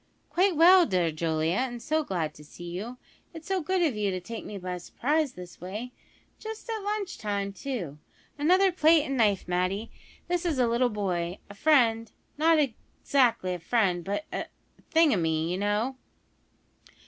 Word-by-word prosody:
"Quite 370 0 +3
well, 350 +3 +7
dear 180 -6 +1
Julia, 160 +2 0
and 245 -2 -2
so 310 +6 0
glad 175 - -2
to 150 - -14
see 170 +3 -10
you. 220 +8 -6 0.4
It 325 - -7
is - - -23
so 385 -1 0
good 365 +3 +1
of 295 -8 +1
you 210 -1 0
to 185 -1 -2
take 225 +5 -7
me 205 - -7
by 180 -1 -5
surprise 290 - -1
this 180 -1 -11
way; 210 +7 -6 0.5
just 440 +1 -8
at 445 - -2
lunch 405 -2 -3
time, 200 -2 -2
too. 195 - -5 0.4
Another 370 +6 +4
plate 320 -3 +4
and 275 - -2
knife, 210 -6 +2
Matty. 185 +5 -1 0.4
This 355 0 0
is 330 -5 0
a 250 - +3
little 235 +2 +2
boy 185 -4 -2
a - - -9
friend 230 -3 +3 0.2
not 320 +2 +4
exactly 250 -6 0
a 180 - -5
friend, 180 -2 +1
but 200 - -3
a - - -1
a - - -12
thingumy, 170 - +3
you 180 +2 -2
know." 210 +6 0
230 Hz, 175 wpm, -28 LUFS, -, 0.5 s, well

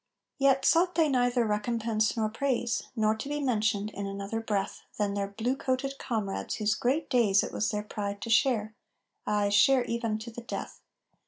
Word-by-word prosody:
III 275 - +4
Yet 270 0 +3
sought 355 +2 +4
they 325 -2 +4
neither 245 -2 +2
recompense 220 +1 0
nor 220 -1 +1
praise, 240 0 -1
Nor 215 -2 +2
to 245 +6 -6
be 295 0 -2
mentioned 215 -5 0
in 200 -1 -5
another 200 +3 -4
breath 205 -3 -2 0.2
Than 205 -1 0
their 200 -1 -1
blue 225 +6 -2
coated 270 0 -2
comrades 215 -5 -3
whose 210 -1 +1
great 260 +8 0
days 215 -6 +3
It - - -5
was 210 - 0
their 210 0 -2
pride 205 -1 -4
to 230 - -5
share 225 -3 +2 0.5
ay, 205 -1 +2
share 250 +5 +5
even 230 -2 -2
to 225 +2 -8
the 240 - -8
death! 235 - -6
225 Hz, 185 wpm, -29 LUFS, 210-255 Hz, 0.5 s, share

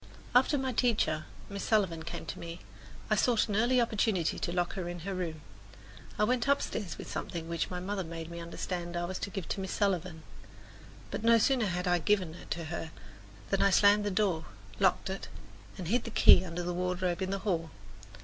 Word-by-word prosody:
After 260 +4 +5
my 265 -1 -1
teacher, 215 -11 +1 0.2
Miss 200 -1 -5
Sullivan, 190 -7 +2
came - - -6
to - - -6
me, 170 +1 -7 0.5
I - - +6
sought 235 -3 +3
an 205 - -2
early 240 +4 +3
opportunity 215 -7 +1
to - - -2
lock 175 0 0
her 180 -2 -4
in 175 -1 -6
her 195 +4 -4
room. 165 -4 -4 0.8
I 210 - +2
went 245 +3 +1
upstairs 220 - 0
with - - -8
something 165 -1 -4
which 170 -1 -2
my 180 - -4
mother 190 +1 -2
made 165 0 -7
me 170 - -6
understand 175 +1 -4
I 175 - -1
was 185 +1 -4
to - - -3
give 195 -4 -5
to - - -2
Miss 190 - -4
Sullivan; 180 -5 -1 0.9
but - - -4
no 230 0 +6
sooner 240 0 +3
had 180 0 -2
I 175 0 +3
given 185 -2 +1
it 180 - -12
to 170 - -2
her 165 - -4 0.6
than - - +2
I 200 - +5
slammed 205 +1 +5
the 205 - 0
door 185 -4 +1 0.3
to, - - -9
locked - - +3
it, - - -5 0.5
and 180 - -5
hid 235 +6 +1
the - - -4
key 210 - +7
under 175 -1 -4
the 175 0 -2
wardrobe 180 0 -1
in 190 - -1
the 195 - -1
hall. 165 -5 0
185 Hz, 210 wpm, -31 LUFS, 170-210 Hz, 0.9 s, key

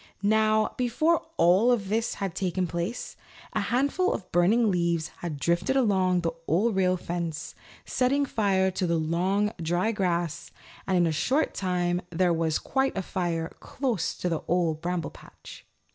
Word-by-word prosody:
Now, 215 +1 +3
before 310 +8 +1
all 205 +8 +5
this 220 +3 -2
had 195 -3 -3
taken 185 0 -1
place, 175 +7 -4 0.4
a - - 0
handful 280 +9 +1
of 185 - -7
burning 205 +6 +3
leaves 170 -2 0
had 165 -4 -4
drifted 170 - +1
along 190 -8 +2
the 165 -1 -1 0.2
Old 200 +7 +2
Rail 185 -1 +2
Fence, 165 -3 -4 0.3
setting 275 +3 +1
fire 195 -6 +1
to 180 0 -1
the 170 0 +1
long, 185 +6 +1
dry 175 +6 +1
grass, 175 -5 -1 0.4
and 190 -1 +2
in 175 - +4
a 165 - +1
short 265 - +1
time 180 -1 0
there 175 0 +2
was 160 -1 +1
quite 270 -3 -1
a 190 - -1
fire 170 -3 -2
close 240 -11 -2
to - - -2
the 165 -3 -1
Old 165 -3 +1
Bramble 175 -3 -2
Patch. - - -14
185 Hz, 160 wpm, -27 LUFS, 170-220 Hz, 0.4 s, all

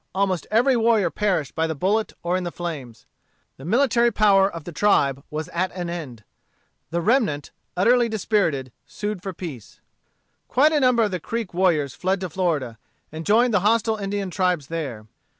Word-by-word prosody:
Almost 190 -3 0
every 245 +4 +3
warrior 225 -6 +2
perished 185 -9 -1
by 160 0 0
the 160 - -3
bullet 205 +8 0
or 175 +1 0
in 185 - -1
the 175 - -4
flames. 145 -11 -7 0.5
The 135 - -11
military 240 +3 +3
power 200 -2 +4
of 165 -2 -8
the 175 - -8
tribe 140 -8 +2
was 155 0 -4
at 185 +2 -1
an 175 -2 -4
end. 135 -10 -7 0.7
The 170 +1 -1
remnant, 210 - +1 0.3
utterly 235 +5 +4
dispirited, 190 - 0 0.2
sued 210 -3 -4
for 195 - -4
peace. 160 - -9 0.7
Quite 290 +5 +4
a 305 - +2
number 250 -4 +3
of 210 - 0
the 180 - -2
Creek 230 +3 -4
warriors 165 -7 +1
fled 185 +6 -1
to 185 -3 -4
Florida, 145 - -1 0.3
and 160 +1 -7
joined 230 +3 +4
the 205 - +4
hostile 220 +2 +2
Indian 200 -2 -3
tribes 180 -6 0
there. 140 -10 -5
185 Hz, 175 wpm, -23 LUFS, 160-215 Hz, 0.7 s, power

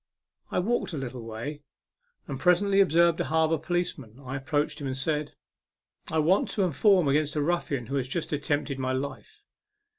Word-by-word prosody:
I - - -2
walked 205 0 0
a - - -3
little 130 -2 -5
way, 115 +7 -6 0.6
and - - -5
presently 195 +2 +4
observed 170 -2 +4
a - - 0
harbour 160 0 +2
police 175 -2 -1
man. 115 -1 -13
I 135 -1 -6
approached 145 +2 -1
him, 140 - -3
and 130 0 -3
said 150 +1 -2 0.4
" - - -45
I 160 - 0
want 165 +6 +3
to 200 - +1
inform 180 - +4
against 150 +2 +1
a 150 - +1
ruffian 145 -6 -1
who 135 +4 -2
has 130 -2 -1
just 160 +4 -3
attempted 145 -1 -1
my 130 0 -1
life." 140 - -5
150 Hz, 185 wpm, -27 LUFS, 135-175 Hz, 0.6 s, presently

